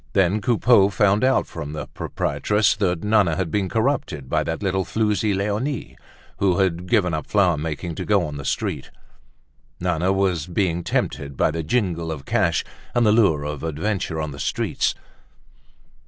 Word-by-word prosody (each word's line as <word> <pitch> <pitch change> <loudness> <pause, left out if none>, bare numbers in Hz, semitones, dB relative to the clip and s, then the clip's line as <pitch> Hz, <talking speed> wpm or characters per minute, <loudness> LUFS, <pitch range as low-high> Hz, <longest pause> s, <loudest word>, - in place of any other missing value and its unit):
Then 95 +2 +2
Coupeau 115 -2 +4
found 100 +3 +2
out 130 +1 +3
from 75 -3 -7
the 75 - -4
proprietress 105 +1 0
that 90 -5 0
Nana 105 -6 +3
was 95 - 0
being 95 +3 -1
corrupted 110 - -1
by - - +2
that - - -3
little 95 -1 0
floozie 105 +1 0
Leonie, 105 +8 -2 0.4
who 95 -3 +2
had 90 -2 0
given 95 -7 +2
up 80 - -3
flower 95 -5 +3
making 80 +2 -4
to - - -5
go 100 -4 +2
on 75 -1 -6
the 70 - -6
street. - - -2 0.9
Nana 90 +1 0
was 95 -5 0
being 85 -1 0
tempted 70 -4 -2
by - - +2
the 80 +1 -3
jingle 85 -2 -1
of 70 -3 -6
cash - - +1 0.3
and 120 -1 +3
the 105 - +5
lure 100 -10 +3
of 75 -1 -4
adventure 80 +1 -2
on 75 -1 -3
the 70 - -9
streets. - - -1
95 Hz, 170 wpm, -22 LUFS, 80-105 Hz, 0.9 s, the